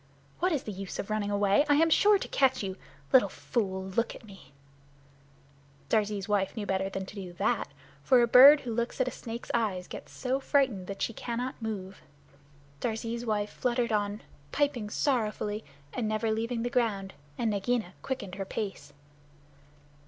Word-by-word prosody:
What 365 +2 +2
is 295 -5 0
the 215 - -5
use 195 -1 -6
of 200 - -4
running 210 -1 0
away? 205 +4 +3
I 290 - +6
am 325 +2 +4
sure 415 +5 +6
to - - -5
catch 265 -4 +2
you. 190 -1 -3 0.4
Little 260 - +6
fool, 190 -5 -2
look 190 +5 -1
at - - -12
me!" 195 -10 -14 1.4
Darzee's 205 -3 +1
wife 205 0 0
knew 210 - -2
better 190 0 0
than 195 0 -4
to - - -11
do 190 -4 -7
that, 175 - 0 0.4
for 245 - +5
a - - +3
bird 275 +5 +9
who 240 -3 -4
looks 235 +3 -2
at 260 - +2
a - - -1
snake's 230 +1 -7
eyes 200 -6 0
gets - - -9
so 260 +1 -1
frightened 260 -10 +1
that 195 - -4
she 230 - -1
cannot 245 +3 -4
move. 195 -4 -5 0.8
Darzee's 230 +2 -3
wife 210 -1 0
fluttered 240 -2 0
on, 205 0 -1 0.3
piping 280 -7 0
sorrowfully, 215 -4 -1 0.3
and 235 -3 -1
never 215 +1 0
leaving 230 +1 -1
the 245 - -2
ground, 200 -6 0 0.2
and 230 -2 +1
Nagaina 210 -1 -1
quickened 210 -8 -4
her - - +1
pace. 190 -9 -5
220 Hz, 175 wpm, -29 LUFS, 200-245 Hz, 1.4 s, bird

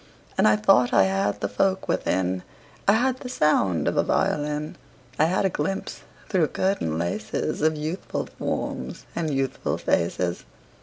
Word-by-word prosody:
And - - +4
I 105 - +6
thought 120 +3 +4
I 95 - +6
had 95 +2 0
the 100 - 0
folk 190 - 0
within: 95 0 0 0.5
I 200 - +7
had 255 +3 +1
the 250 - -7
sound 125 - +2
of - - 0
a - - +4
violin; 150 +1 0 0.4
I 155 - +6
had 185 +4 +1
a - - +3
glimpse 170 +6 -3 0.3
through 180 -6 +2
curtain 185 - -1
laces 85 - -2
Of 155 +1 +3
youthful 155 +5 -3
forms - - -4
and 160 -3 -1
youthful 135 -1 -1
faces. 85 +1 0
150 Hz, 155 wpm, -25 LUFS, -, 0.5 s, I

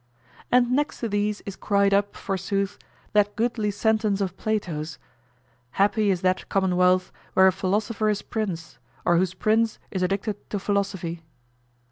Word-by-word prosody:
And 245 0 +4
next 290 +4 0
to 235 - 0
these 205 0 0
is 200 - -7
cried 200 -1 +2
up, 205 0 +1
forsooth, 195 +1 -2 0.3
that 205 -1 +3
goodly 225 -2 0
sentence 215 0 +1
of 190 -2 -2
Plato's, 170 -9 -3 0.8
"Happy 205 +1 +2
is 185 -3 +1
that 185 0 0
commonwealth 185 -1 +2 0.2
where 190 - +7
a 190 - +7
philosopher 205 +4 0
is 210 -1 -1
prince, 190 - -4 0.3
or 175 -1 +4
whose 185 +1 +1
prince 220 +3 +2
is 190 - -2
addicted 195 +3 -2
to 205 - -2
philosophy." 195 -4 -2
200 Hz, 145 wpm, -25 LUFS, 185-215 Hz, 0.8 s, where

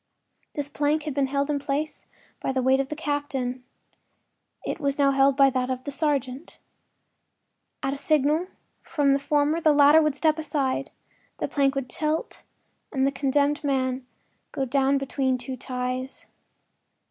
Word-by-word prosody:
This 290 -1 -2
plank 295 +1 0
had 300 -2 -4
been 275 0 +1
held 280 +2 0
in 285 - 0
place 285 +2 -3 0.3
by - - -1
the 260 -1 -1
weight 265 +1 +4
of 275 0 -1
the 305 - -4
captain; 285 -4 -3 1.0
it - - -3
was 280 -1 -1
now 280 -1 +4
held 275 0 +3
by 275 -1 +6
that 255 0 -1
of 255 0 -3
the 285 - -5
sergeant. 280 -1 -1 1.3
At 270 - 0
a - - -5
signal 305 +4 +2 0.3
from 285 -4 +1
the 275 - +2
former 295 +3 +1
the 310 - +5
latter 290 +2 +7
would 305 -2 +1
step 310 +1 +2
aside, 275 -3 -1 0.5
the - - -2
plank 275 -1 +1
would 275 -2 -2
tilt 305 +5 -2 0.5
and 265 -3 +1
the 275 - +2
condemned 285 +2 +1
man 260 -2 -1 0.4
go 270 - -2
down 270 +1 +2
between 270 -1 0
two 255 +1 -6
ties. 255 0 -4
275 Hz, 160 wpm, -25 LUFS, 265-295 Hz, 1.3 s, latter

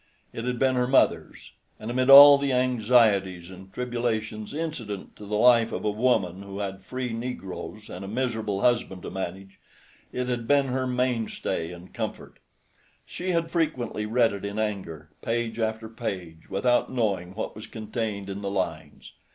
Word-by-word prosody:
It 115 - -5
had 125 -1 -1
been 130 +1 +2
her 125 -1 +1
mother's, 135 - +1 0.3
and 110 +2 -5
amid 130 +2 +1
all 140 +1 +11
the 140 -1 0
anxieties 110 -8 +2
and 95 +1 -12
tribulations 115 -2 -3
incident 135 - -5
to 105 - -10
the 105 +1 -1
life 115 0 +5
of - - -4
a 105 - +2
woman 105 -5 +1
who 100 0 -8
had 95 -1 -4
free 125 +4 -4
negroes 110 -3 -6
and - - -8
a - - -6
miserable 110 -3 -2
husband 110 -7 +1
to - - -6
manage, 95 +1 -6 0.5
it 125 0 -3
had 120 -2 -2
been 140 -2 +3
her 130 0 -1
mainstay 125 -9 -1
and 90 +1 -12
comfort. - - -6 0.7
She 180 +1 -5
had 170 -2 0
frequently 130 -10 -1
read 115 -1 +3
it 100 - -7
in 100 +1 -4
anger, 95 -8 -4
page 115 0 -2
after 110 0 -2
page, 95 -8 -6
without 120 +7 +1
knowing 100 -7 -1
what 110 - -4
was 110 - -9
contained 110 -2 -4
in 100 +1 -5
the 100 - -3
lines. 80 -6 -4
110 Hz, 170 wpm, -26 LUFS, 100-125 Hz, 0.7 s, all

